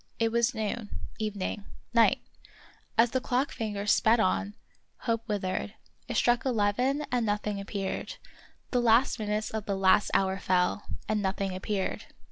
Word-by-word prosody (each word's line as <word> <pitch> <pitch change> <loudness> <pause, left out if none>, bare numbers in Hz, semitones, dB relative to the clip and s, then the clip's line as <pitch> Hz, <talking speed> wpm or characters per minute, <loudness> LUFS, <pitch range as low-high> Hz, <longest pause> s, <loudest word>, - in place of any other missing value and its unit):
It 225 -1 +1
was 235 +3 +2
noon 220 0 -3 0.2
— - - -22
even 210 -3 -2
ing 200 +1 -4
— - - -32
night; 230 -1 +4 0.8
as 230 +1 +5
the 260 - 0
clock 255 +3 0
fingers 210 -3 -1
sped 225 +2 +4
on, 205 0 +1 0.5
hope 230 -1 -1
withered; 200 0 -2 0.3
it - - -2
struck 240 -1 +3
eleven 250 +5 +1
and 245 -1 +1
nothing 205 -1 -1
appeared; 195 -1 -4 0.6
the 245 - +2
last 235 +2 +4
minutes 210 0 -1
of 220 -2 -4
the 200 -1 0
last 190 +2 +4
hour 190 0 +2
fell, 180 +2 +1 0.2
and 215 -1 0
nothing 195 -1 -1
appeared. 190 +1 -2
215 Hz, 160 wpm, -29 LUFS, 200-235 Hz, 0.8 s, as